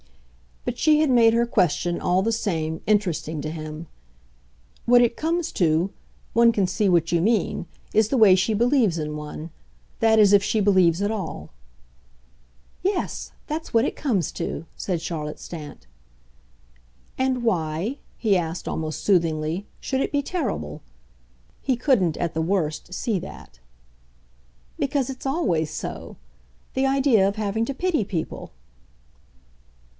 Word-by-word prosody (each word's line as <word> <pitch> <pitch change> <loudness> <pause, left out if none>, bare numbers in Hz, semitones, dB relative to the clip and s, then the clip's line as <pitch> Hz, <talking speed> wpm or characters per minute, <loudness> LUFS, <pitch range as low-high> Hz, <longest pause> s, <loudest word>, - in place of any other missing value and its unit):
But 240 - -3
she 305 -1 +4
had 310 -2 +3
made 230 -2 +5
her 235 +1 +3
question, 175 -6 +1
all 180 +1 +2
the 225 - +1
same, 160 -8 -2
interesting 180 -7 0
to 155 - -4
him. 155 0 -7 1.0
"What 245 0 +6
it 235 -1 +2
comes 330 +1 -1
to 170 +2 +2 0.4
one 235 +1 +6
can 205 -4 +1
see 195 +2 +1
what 170 -2 +2
you 170 -1 +2
mean 210 -4 +1 0.3
is 220 -1 +3
the 265 - +1
way 215 -5 +7
she 190 +4 +1
believes 235 - +3
in 150 -1 -3
one. 150 +2 -7 0.5
That 225 0 +4
is 205 -1 +6
if 200 -1 +6
she 220 - +1
believes 190 -4 +4
at 205 - 0
all." 170 - -5 1.3
"Yes, 385 +1 -2
that's 315 +2 -5
what 230 +2 +5
it - - -2
comes 210 - 0
to," 165 - -4
said 175 -4 -2
Charlotte 155 -3 -4
Stant. 150 - -9 1.3
"And 260 -2 0
why," 180 - -1 0.2
he 215 -4 +2
asked, 165 0 -4
almost 155 -1 -3
soothingly, 165 -1 +1
"should 265 0 -1
it - - -1
be 285 - +1
terrible?" 355 +3 -3 0.8
He 260 - +1
couldn't, 230 - +2
at 170 -1 -2
the 160 - -1
worst, 165 -1 -1
see 215 -1 -1
that. 65 - -11 1.2
"Because 275 -2 0
it's 260 - -10
always 175 - 0
so - - -6 0.6
the 265 +1 +2
idea 270 -7 +4
of 200 - -2
having 215 +1 -1
to 275 - -3
pity 345 -4 0
people." 180 -5 -5
200 Hz, 145 wpm, -24 LUFS, 165-240 Hz, 1.3 s, way